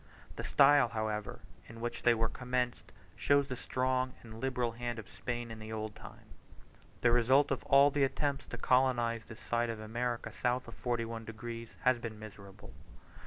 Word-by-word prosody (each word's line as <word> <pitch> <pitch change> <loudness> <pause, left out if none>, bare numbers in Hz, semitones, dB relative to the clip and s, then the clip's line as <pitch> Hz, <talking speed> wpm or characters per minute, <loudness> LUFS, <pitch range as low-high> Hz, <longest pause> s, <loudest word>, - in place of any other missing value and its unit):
The - - -5
style, 140 -1 +6
however, 110 -1 -3 0.3
in 115 0 -11
which 120 +1 -4
they 120 -1 +5
were 115 0 +1
commenced 125 0 -2 0.2
shows 140 -1 +3
the 130 - -2
strong 130 +1 -1
and 110 -1 -10
liberal 125 -3 0
hand 120 0 -4
of 110 - -8
Spain 120 -1 -5
in 110 - -8
the 110 0 -8
old 110 -1 -4
time. - - -12 0.8
The 120 - +4
result 130 +4 +4
of - - -1
all 140 +1 +6
the 140 0 +2
attempts 140 +1 -1
to 125 - -6
colonize 120 -2 +2
this 115 - -11
side 120 0 0
of 115 -1 -4
America 120 +2 -3
south 125 0 -1
of 115 - -9
41 115 -2 -3
degs., 115 +1 -7
has 125 -1 +3
been 115 -2 -6
miserable. 100 - -11
120 Hz, 175 wpm, -33 LUFS, 115-130 Hz, 0.8 s, style